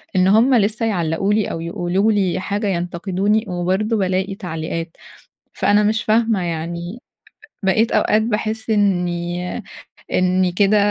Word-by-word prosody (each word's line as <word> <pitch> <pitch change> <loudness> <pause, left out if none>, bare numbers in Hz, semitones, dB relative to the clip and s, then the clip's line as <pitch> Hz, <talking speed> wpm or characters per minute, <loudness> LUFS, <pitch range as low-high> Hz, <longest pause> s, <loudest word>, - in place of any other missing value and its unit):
إن 185 0 +4
هم 230 +6 +5
لسه 220 +1 +1
يعلقوا 185 0 0
لي 215 -1 +2
أو 165 - -4
يقولوا 175 +5 0
لي 195 -4 +1
حاجة، 205 +2 -2
ينتقدوني، 190 +4 -1
وبرضه 190 +5 0
بالاقي 190 +1 -1
تعليقات. 165 -2 -5 0.6
فأنا 205 +1 +3
مش 220 +1 +1
فاهمة 220 -3 +2
يعني، 170 +4 -4 0.6
بقيت 215 +4 +2
أوقات 215 +1 +3
باحس 220 0 -2
إني 175 -4 0 0.7
إني 185 0 +2
كده 200 +3 +3
195 Hz, 125 wpm, -20 LUFS, 175-215 Hz, 0.7 s, هم